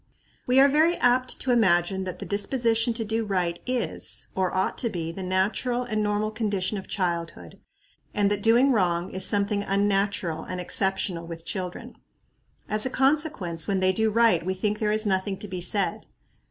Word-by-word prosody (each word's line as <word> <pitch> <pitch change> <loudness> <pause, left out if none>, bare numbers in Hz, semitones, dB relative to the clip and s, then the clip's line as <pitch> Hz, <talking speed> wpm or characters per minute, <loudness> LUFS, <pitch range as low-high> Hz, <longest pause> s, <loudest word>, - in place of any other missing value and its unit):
We 250 +1 +4
are 275 - +8
very 310 +5 +3
apt 250 +1 +1
to 260 - 0
imagine 190 -4 +2
that 185 - -5
the - - -7
disposition 230 +2 +1
to 225 -1 -2
do 225 +1 -1
right 180 -4 -1
is, 250 -1 -3
or 185 -1 0
ought 185 0 0
to 235 - 0
be, 165 -5 -4
the 190 - -7
natural 200 +7 0
and 215 -3 -2
normal 210 +1 0
condition 210 -2 -2
of 190 - -11
childhood, 170 -4 -4 0.5
and 205 -1 +1
that 205 -1 -1
doing 235 +5 +4
wrong 180 -5 +1
is 190 - +1
something 205 0 +1
unnatural 195 -4 0
and 185 - -5
exceptional 180 -2 -1
with 165 -1 -8
children. 185 -2 -6 0.7
As 215 0 -1
a 260 - +2
consequence, 265 - 0
when 195 -2 0
they 185 0 +3
do 220 +3 +1
right 225 -6 +3
we 190 +2 -2
think 210 +2 -1
there 210 -1 +1
is 215 +1 +1
nothing 195 0 0
to 210 - -5
be 185 -2 -5
said. 200 +3 0
200 Hz, 180 wpm, -25 LUFS, 185-225 Hz, 0.7 s, are